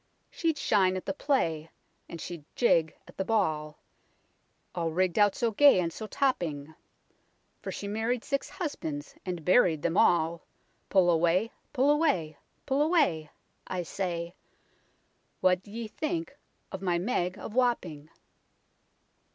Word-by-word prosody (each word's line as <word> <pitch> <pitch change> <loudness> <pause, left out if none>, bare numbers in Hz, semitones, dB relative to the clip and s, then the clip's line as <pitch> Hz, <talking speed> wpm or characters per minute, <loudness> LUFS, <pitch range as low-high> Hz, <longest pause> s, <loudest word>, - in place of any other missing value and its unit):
She'd 325 -3 -1
shine 190 -7 +2
at 185 - -7
the - - -2
play, 165 - 0 0.4
and 170 - -7
she'd 170 -2 -7
jig 165 -10 +2
at - - -16
the 190 - 0
ball, 155 -8 0 1.0
All 165 -2 -1
rigg'd 180 +3 0
out 205 -1 +4
so 235 -1 0
gay 280 -1 +6
and 165 -2 -1
so 220 - -6
topping; 160 - -1 0.9
For - - -5
she 200 - -6
married 225 +3 -1
six 275 - -2
husbands, 160 - -5
and 175 -4 -4
buried 180 -6 +4
them 170 +2 0
all. 170 -1 +3 0.5
Pull 185 -3 +4
away, 175 +7 +2 0.2
pull 280 +1 +3
away, 280 - +1 0.3
pull 270 +2 +1
away 290 - +2 0.4
1 185 - -4
I - - -1
say; 170 -1 -4 1.1
What 185 -1 +3
d'ye 225 +4 -7
think 325 +9 -4 0.4
of 190 - -6
my 180 -3 +1
Meg 180 -2 -1
of - - -8
Wapping 185 - 0
185 Hz, 140 wpm, -29 LUFS, 165-245 Hz, 1.1 s, gay